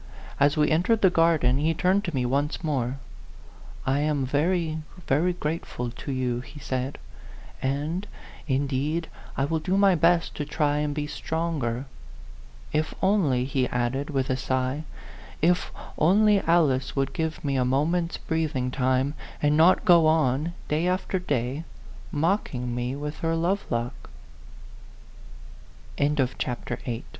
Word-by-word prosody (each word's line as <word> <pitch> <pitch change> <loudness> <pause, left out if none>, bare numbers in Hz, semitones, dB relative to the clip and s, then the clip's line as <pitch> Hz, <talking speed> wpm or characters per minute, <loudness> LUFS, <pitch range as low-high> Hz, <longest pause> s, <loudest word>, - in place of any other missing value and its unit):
As 145 +2 +4
we 150 0 +3
entered 185 +8 +2
the 190 - +6
garden, 160 -7 +3
he 160 +2 +1
turned 185 +4 +2
to 175 - -3
me 125 -2 +1
once 140 +7 -1
more. 135 -4 -1 0.5
" - - -18
I - - +1
am 145 -2 +1
very, 160 +3 0 0.3
very 160 +7 +2
grateful 150 -7 -4
to 140 - -6
you," 125 -2 -1
he 145 +3 -12
said, 130 -1 -3 0.6
"and, 150 +9 -2 0.4
indeed, 140 +4 -1 0.3
I 135 - +2
will 160 +2 0
do 185 +5 0
my 200 -1 +5
best 170 0 +3
to 150 - -1
try 145 0 0
and 150 -1 -1
be 150 -1 -1
stronger. 150 -6 -2 0.9
If 155 +1 0
only," 165 -11 +3
he 130 -1 0
added, 125 +4 -1
with 135 -3 0
a - - +2
sigh, 130 +3 -1 0.3
" - - -18
if 180 0 0 0.3
only 205 +5 +5
Alice 155 -6 +2
would 135 -1 0
give 160 +1 -3
me 140 -1 0
a 130 - +2
mo 135 +4 +2
ment's 170 +1 -1
breathing 155 -6 -1
time, 130 +1 +1 0.3
and 150 0 +2
not 165 +4 +5
go 170 -3 +6
on, 155 +1 +2
day 155 +4 0
after 185 +1 0
day, 140 -3 -2 0.5
mocking 145 - 0
150 Hz, 130 wpm, -26 LUFS, 130-165 Hz, 0.9 s, the